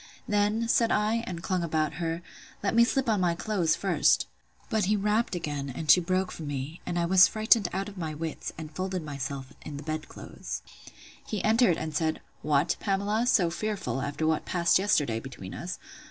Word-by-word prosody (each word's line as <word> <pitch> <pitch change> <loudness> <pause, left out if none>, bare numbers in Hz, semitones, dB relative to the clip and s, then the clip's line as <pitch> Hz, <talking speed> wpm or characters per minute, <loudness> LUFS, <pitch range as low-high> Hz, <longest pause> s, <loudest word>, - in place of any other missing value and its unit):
Then, 210 +2 +1
said 230 0 +3
I, 215 +2 +1
and 170 -4 -5
clung 185 -2 0
about 155 -2 0
her, 165 +1 -2 0.4
let 200 - +1
me 235 +1 +6
slip 265 +2 +1
on 215 -4 +2
my 175 -2 +2
clothes 180 -3 +1
first. - - +3 0.4
But 220 -4 +1
he 210 +3 +2
rapped 210 +1 +1
again, 145 -5 -3
and 150 +4 +2
she - - +8
broke 185 +1 0
from 155 - -7
me; 145 +3 -5
and 175 - -2
I 170 - +2
was 185 +2 +7
frightened 220 -2 +3
out 195 +2 -2
of 200 -2 -9
my 155 -2 -3
wits, 160 +1 -4
and 155 -1 -8
folded 185 -2 -2
myself 140 -2 -5
in 145 -2 -7
the 145 - -7
bed 155 0 -4
clothes. - - -7 0.6
He 210 - -3
entered, 220 -5 +4
and 155 -1 -4
said, 160 -1 0 0.2
What, 150 +3 +2
Pamela, 205 +4 0
so 180 -8 +3
fearful, 205 -7 -2
after 145 +4 -2
what 160 -1 +1
passed 170 0 +3
yesterday 150 - +1
between 115 -7 -9
us! 180 +1 -5
175 Hz, 195 wpm, -28 LUFS, 155-210 Hz, 0.6 s, she